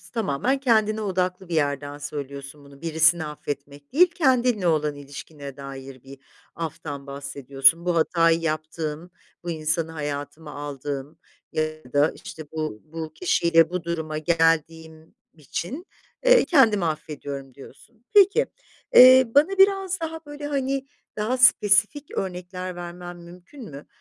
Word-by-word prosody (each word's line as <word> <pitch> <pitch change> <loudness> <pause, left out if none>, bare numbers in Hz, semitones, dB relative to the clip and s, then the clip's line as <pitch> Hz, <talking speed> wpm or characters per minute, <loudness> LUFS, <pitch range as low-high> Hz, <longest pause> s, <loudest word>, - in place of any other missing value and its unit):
tamamen 225 - 0
kendine 220 -4 +2
odaklı 185 -1 -2
bir 170 - -4
yerden 145 -1 -1
söylüyorsun 140 0 -7
bunu. 140 0 -16
Birisini 160 0 +3
affetmek 145 -1 -7
değil, 360 +5 +5
kendinle 250 - +2
olan 150 -2 +1
ilişkine 140 0 -10
dair 135 -2 -9
bir 135 0 -13 0.4
aftan 145 -3 -6
bahsediyorsun. 140 +2 +2
"Bu 175 -1 0
hatayı 165 0 +3
yaptığım, 155 +1 -4 0.3
bu 175 - -3
insanı 160 0 -1
hayatıma 150 0 -6
aldığım 145 +1 -6 0.3
ya 155 -4 -4
da, 145 +2 +3
işte, 155 -2 -9
bu 155 -9 -4
bu 160 0 -7
kişiyle 170 -2 +3
bu 180 -1 -4
duruma 160 -2 -3
geldiğim 160 0 0 0.2
için, 175 - -6 0.4
eee, - - +6
kendimi 225 - +4
affediyorum." 145 -4 -5
diyorsun. 220 - -16
Peki, 410 +3 +5 0.5
eee, 255 +1 +9
bana 295 +4 +6
biraz 385 -1 +3
daha, 325 0 -5
böyle, 290 0 -7
hani, 275 -1 -2 0.3
daha 220 +5 -1
spesifik 220 +3 +4
örnekler 180 -1 -5
vermen 175 0 -8
mümkün 175 +10 -13
mü? 140 +1 -11
165 Hz, 125 wpm, -24 LUFS, 145-210 Hz, 0.5 s, eee